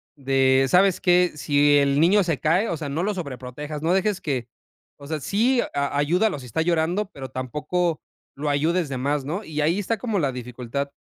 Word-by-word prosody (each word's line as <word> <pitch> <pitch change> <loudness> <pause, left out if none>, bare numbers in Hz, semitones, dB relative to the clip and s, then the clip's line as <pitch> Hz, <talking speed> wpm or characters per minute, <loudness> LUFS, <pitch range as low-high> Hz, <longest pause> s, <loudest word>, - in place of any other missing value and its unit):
de, 135 -1 +3
¿sabes 185 +2 +4
qué? 180 -1 +3
Si 145 0 +3
el 140 0 +2
niño 195 +4 +5
se 165 -5 -1
cae, 175 +8 +2
o 170 - -1
sea, 150 -2 -5
no 155 +5 -2
lo 210 +2 0
sobreprotejas, 145 -2 -6
no 165 +3 +1
dejes 195 0 0
que 130 -6 -2 0.5
o 140 - -11
sea, 155 -1 -3
sí 240 - +2
a 140 0 -1
ayúdalo 175 +6 +1
si 130 - -10
está 125 +7 -2
llorando, 175 +4 0
pero 135 -2 -8
tampoco 150 +6 -2 0.3
lo 150 +2 -3
ayudes 160 +3 +1
de 135 - -3
más, 140 +1 -1
¿no? 180 +9 -3
Y 155 -3 -4
ahí 165 +6 +1
está 220 +3 -1
como 215 -2 -2
la 140 -5 0
dificultad, 125 +3 -5
150 Hz, 200 wpm, -23 LUFS, 140-180 Hz, 0.5 s, niño